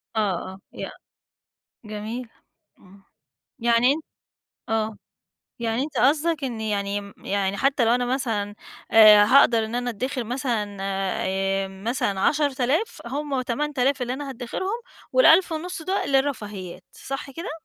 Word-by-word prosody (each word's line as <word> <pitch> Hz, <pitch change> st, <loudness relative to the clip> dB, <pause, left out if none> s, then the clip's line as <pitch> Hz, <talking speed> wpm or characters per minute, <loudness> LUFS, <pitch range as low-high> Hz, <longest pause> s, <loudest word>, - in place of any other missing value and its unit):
آه، -, -, +1 dB, 0.3 s
آه 190 Hz, -, -13 dB
ي -, -, -6 dB, 1.0 s
جميل، 215 Hz, +3 st, -6 dB, 0.5 s
امم، 195 Hz, +1 st, -19 dB, 0.6 s
يعني 235 Hz, +3 st, +4 dB
أنت 310 Hz, +1 st, -5 dB, 0.7 s
آه 220 Hz, -1 st, -1 dB, 0.6 s
يعني 230 Hz, +2 st, 0 dB
أنت 290 Hz, -2 st, -6 dB
قصدك 305 Hz, +3 st, +2 dB
إني 220 Hz, -3 st, -3 dB
يعني 200 Hz, 0 st, -3 dB
يعني 200 Hz, 0 st, -1 dB
حتى 270 Hz, -3 st, +2 dB
لو 235 Hz, +2 st, +4 dB
أنا 245 Hz, 0 st, 0 dB
مثلًا 225 Hz, -5 st, -2 dB, 0.4 s
آآ، 215 Hz, -2 st, +9 dB
هاقدر 230 Hz, -2 st, +5 dB
إن 225 Hz, -, -5 dB
أنا 245 Hz, 0 st, -1 dB
اتدخر 250 Hz, +3 st, -3 dB
مثلًا 230 Hz, -4 st, -2 dB
آآ، 195 Hz, 0 st, -1 dB
مثلًا 195 Hz, 0 st, -2 dB
10000 290 Hz, -, +1 dB
هم 280 Hz, 0 st, -2 dB
8000 275 Hz, +1 st, 0 dB
اللي 245 Hz, +1 st, -2 dB
أنا 280 Hz, +1 st, -5 dB
هاتدخرهم، 375 Hz, -, -4 dB, 0.3 s
وال1500 325 Hz, +4 st, +4 dB
دول 375 Hz, -4 st, -1 dB
للرفاهيات، 210 Hz, -10 st, -1 dB
صح 275 Hz, +1 st, -6 dB
كده؟ 335 Hz, +6 st, -6 dB
245 Hz, 125 wpm, -24 LUFS, 205-275 Hz, 1.0 s, آآ